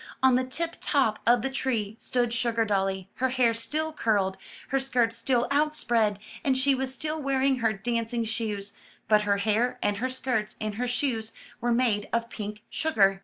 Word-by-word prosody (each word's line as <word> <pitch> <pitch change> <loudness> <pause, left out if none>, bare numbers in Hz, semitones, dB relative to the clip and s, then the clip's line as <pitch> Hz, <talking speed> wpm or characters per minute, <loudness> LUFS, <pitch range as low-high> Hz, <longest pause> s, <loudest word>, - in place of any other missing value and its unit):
On 260 -1 +6
the 255 +1 +3
tip 330 +6 -3
top 260 -8 +2
of 240 -1 +5
the 270 - 0
tree 230 -6 -1
stood 245 -2 0
Sugardolly, 205 -5 0
her 260 +1 +1
hair 245 -2 +3
still 310 +7 -2
curled, 200 -8 +1 0.3
her 270 - +2
skirts 245 -4 +1
still 240 +1 +1
outspread, 240 -8 +2 0.3
and 265 -2 +2
she 275 +1 +3
was 265 0 -1
still 310 +3 -3
wearing 270 -1 +2
her 230 -2 +2
dancing 230 +2 -1
shoes, 215 -3 -3 0.3
but 210 -1 +3
her 200 - +4
hair, 225 +5 +1
and 205 -1 +1
her 255 +4 -1
skirts, 250 -4 -2
and 215 -1 -2
her 250 - 0
shoes 240 -3 -1 0.3
were 240 0 0
made 235 -4 +1
of 235 0 -1
pink 210 0 -6
sugar. 195 -11 +2
235 Hz, 175 wpm, -27 LUFS, 215-260 Hz, 0.3 s, On